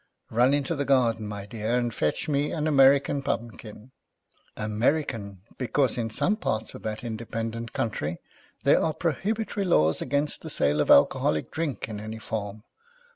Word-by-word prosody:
Run 125 +5 +4
into 145 +3 -1
the 140 - -1
garden, 120 -6 +2
my 100 -1 -6
dear, 110 +2 -2
and 120 -1 -1
fetch 75 - -1
me 145 -1 0
an 155 -2 -2
American 140 -1 +4
Pumpkin! 115 -3 -5 0.7
American, 110 - -1 0.2
because 130 +1 +1
in 115 -2 -2
some 205 - +1
parts 110 - -2
of - - -9
that 110 +3 -4
independent 115 0 -4
country, 85 -7 -2 0.5
there - - +5
are 160 -2 0
prohibitory 205 +6 -1
laws 80 - +3
against 145 +2 -1
the 160 - -7
sale 75 - +1
of - - -1
alcoholic 75 +2 +4
drinks 155 -5 -3
in 105 -2 -6
any 110 +1 -6
form. 105 -1 -5
115 Hz, 155 wpm, -26 LUFS, 110-140 Hz, 0.7 s, there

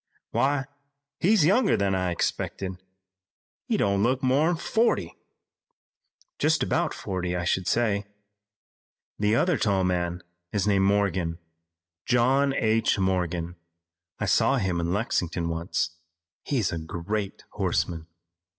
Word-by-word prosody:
"Why, 135 +3 +1 0.5
he's 195 -3 +4
younger 200 +5 +4
than 100 -1 +1
I 90 -1 0
expected. 95 +2 -3 0.9
He - - +1
don't 100 -1 +1
look 130 +5 +1
more'n 145 +7 +3
forty." 195 - 0 1.2
"Just - - +2
about - - 0
forty, 90 -1 -3
I 90 - -2
should 95 0 0
say. 105 -4 +1 1.1
The 105 +1 +2
other 170 +3 +2
tall 100 -3 +2
man 90 -1 -1 0.3
is 100 -2 0
named 100 -2 +3
Morgan, 95 -4 +1 0.7
John 130 +3 +3
H. 110 0 +2
Morgan. 90 -2 -1 0.6
I - - -2
saw - - +3
him 90 -2 0
in 85 0 -1
Lexington 90 -5 -1
once. 85 0 -1 0.5
He's 120 - 0
a 85 - -3
great 95 +6 -4
horseman. 80 -2 -1
100 Hz, 120 wpm, -26 LUFS, 90-120 Hz, 1.2 s, he's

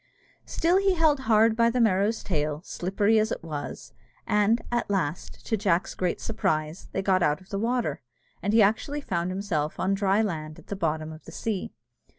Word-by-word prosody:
Still 345 +3 +2
he 390 -1 +3
held 315 -4 +3
hard 220 0 +5
by 230 0 +4
the 250 +2 -1
Merrow's 215 0 +2
tail, 150 -2 -2
slippery 200 +4 +1
as 215 +1 0
it - - -4
was; 150 -3 -6 0.3
and, 210 +3 +3
at 240 -3 -1
last, 175 -5 -3
to 225 - 0
Jack's 190 -4 +1
great 180 -1 -1
surprise, 160 -7 -2
they 195 - -2
got 190 -1 +3
out 150 -1 +2
of 185 - -19
the 200 - -2
water, 230 - -1 0.4
and 205 - 0
he 220 0 +6
actually 225 +8 0
found 170 -9 -2
himself 185 -6 -2
on 190 +1 +1
dry 200 +2 +2
land 155 -6 -4
at - - -15
the 200 - -2
bottom 160 -3 -2
of 155 0 -12
the - - -10
sea. 215 -4 -4
195 Hz, 190 wpm, -26 LUFS, 170-225 Hz, 0.4 s, he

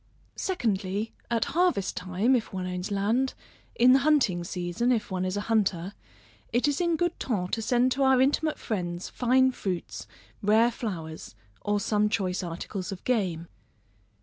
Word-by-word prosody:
Secondly, 210 - -1 0.2
at 235 -1 +1
harvest 340 - +1
time, 185 +8 +1
if 230 -3 -2
one 185 -1 -4
owns 180 +1 -4
land, 220 +7 0 0.4
in 250 +2 +6
the 270 - +6
hunting 270 - +2
season, 180 +7 -1
if 225 -5 0
one 185 -1 -1
is 185 +2 -2
a - - -1
hunter, 200 -4 0 0.6
it 240 +5 +2
is 290 +3 0
in 340 -1 +2
good 350 +1 -1
ton 190 -8 -1
to 225 - -1
send 245 +2 +2
to 275 - -1
our 265 -1 +5
intimate 295 +4 +2
friends, 175 -4 -4
fine 260 +1 +3
fruits, 170 - -5 0.3
rare 220 +3 +4
flowers, 160 - -6 0.3
or 205 0 0
some 210 +1 +1
choice 185 -3 -1
articles 180 +3 -5
of 190 - -7
game. 185 -9 0
210 Hz, 160 wpm, -27 LUFS, 185-255 Hz, 0.6 s, in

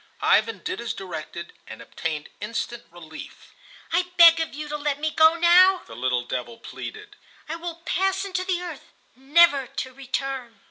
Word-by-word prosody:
Ivan 220 -2 +2
did 190 - -4
as 235 - -4
directed, 170 -2 -7
and - - -9
obtained 155 -3 -5
instant 230 +2 -5
relief. 160 -2 -12 0.4
"I 355 +1 +2
beg 335 -1 +9
of 325 -3 -3
you 300 +1 -6
to 300 - -3
let 290 -1 -2
me 310 +1 -1
go 320 +1 +5
now," 360 +2 +5
the - - -12
little 125 0 0
devil 130 - -5
pleaded; 420 - -9 0.3
"I 315 - -4
will 335 0 -7
pass 385 +3 0
into 370 -2 -2
the 365 -1 -2
earth, 340 -5 -9 0.2
never 280 +1 +4
to 260 +1 -6
return." 270 -2 -5
290 Hz, 170 wpm, -24 LUFS, 220-340 Hz, 0.4 s, beg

